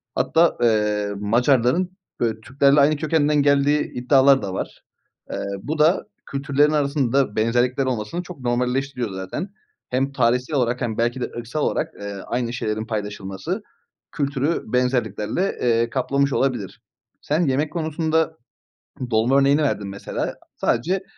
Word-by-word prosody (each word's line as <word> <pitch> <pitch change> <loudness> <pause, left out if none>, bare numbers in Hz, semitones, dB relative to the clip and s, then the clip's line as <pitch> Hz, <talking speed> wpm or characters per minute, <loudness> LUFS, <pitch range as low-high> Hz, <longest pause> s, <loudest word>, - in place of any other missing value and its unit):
Hatta, 165 +1 +3
eee, 105 -3 +2
Macarların, 125 - +2 0.3
ııı, 110 -2 0
Türklerle 140 +4 +3
aynı 145 +2 +5
kökenden 150 -1 +2
geldiği 145 +1 +2
iddiaları 135 +2 +4
da 95 -2 -4
var. - - -5 0.5
Eee, - - -3 0.3
bu 155 +1 -3
da 160 +6 +4 0.2
kültürlerin 140 +2 +1
arasında 140 -5 +1
benzerlikler 125 +4 +1
olmasını 125 +7 -2
çok 180 -4 -10
normalleştiriyor 125 0 -1
zaten. 95 - -5 0.4
Hem 135 +2 0
tarihsel 125 +3 +1
olarak 125 0 0
hem 115 -3 -2
belki 120 +2 0
de - - +1
ırksal 120 +6 -4
olarak, - - -1
eee, 100 0 -5
aynı 120 -1 -2
şeylerin 110 -2 -2
paylaşılması 105 - -4 0.5
kültürü 140 +2 -1
benzerliklerle, 125 - 0
eee, 115 -1 +2
kaplamış 140 +2 0
olabilir. 120 -8 -1 0.4
Sen 160 +4 +1
yemek 145 +5 0
konusunda 160 0 0 0.7
dolma 115 +5 +3
örneğini 140 +2 +4
verdin 105 -8 -1
mesela. 100 +1 -4 0.2
Sadece 180 +11 0
130 Hz, 130 wpm, -22 LUFS, 115-145 Hz, 0.7 s, aynı